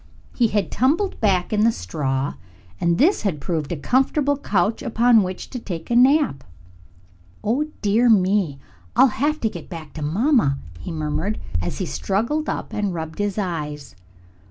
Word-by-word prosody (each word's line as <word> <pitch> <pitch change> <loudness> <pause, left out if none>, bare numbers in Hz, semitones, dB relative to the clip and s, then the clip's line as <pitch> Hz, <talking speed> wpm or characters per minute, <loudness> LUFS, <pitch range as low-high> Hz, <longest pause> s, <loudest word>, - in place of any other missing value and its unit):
He 240 - +3
had 205 -4 -1
tumbled 315 - +1
back 190 -3 +2
in 210 0 +3
the 230 - +5
straw 135 - -2 0.5
and 170 0 +2
this 350 - +3
had 190 -8 -1
proved 155 +1 -3
a - - 0
comfortable 270 - +2
couch 210 -6 0
upon 235 0 +4
which 185 -1 -5
to 250 - -4
take 175 -3 -6
a - - +2
nap. 255 - +4 1.0
"Oh, 260 +8 0 0.2
dear 220 +4 +3
me, 190 -7 +3 0.4
I'll - - +7
have 300 +5 0
to 225 - +2
get 220 - -7
back 165 -5 -8
to 155 - -7
mamma!" 185 - +2 0.2
he 175 - -6
murmured, 155 +6 -2 0.2
as 85 - -4
he 190 - -2
struggled 235 - -1
up - - -4
and 205 -4 -1
rubbed 160 +1 -6
his 205 -1 -1
eyes. 150 - -4
200 Hz, 165 wpm, -22 LUFS, 160-240 Hz, 1.0 s, I'll